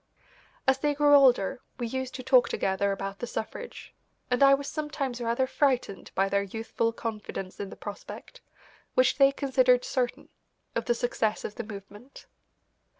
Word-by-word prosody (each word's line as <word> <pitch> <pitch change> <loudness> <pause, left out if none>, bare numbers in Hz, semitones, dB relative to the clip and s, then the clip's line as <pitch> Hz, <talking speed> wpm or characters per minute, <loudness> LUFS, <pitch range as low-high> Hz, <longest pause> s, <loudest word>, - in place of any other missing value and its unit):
As 265 0 +4
they 295 +1 +1
grew 290 0 +4
older 260 -4 +5 0.2
we 240 - -3
used 260 +2 -4
to 255 - -6
talk 255 -1 +5
together 195 +1 0
about 195 0 -4
the 240 - -4
suffrage, 475 - -6 0.4
and 250 - +1
I 275 0 +8
was 280 0 -6
sometimes 285 -5 -3
rather 235 +2 +1
frightened 260 -7 0
by 195 +1 +2
their 200 0 +1
youthful 225 +3 -2
confidence 215 -4 -6
in 200 - -4
the - - -9
prospect, 205 -1 -9 0.5
which 255 +2 +3
they 275 0 +7
considered 255 -3 +3
certain, 250 -2 -2 0.4
of - - -2
the 240 - +2
success 230 -3 -1
of 210 - -5
the 235 - -5
movement. 205 +4 -11
245 Hz, 160 wpm, -28 LUFS, 210-270 Hz, 0.5 s, I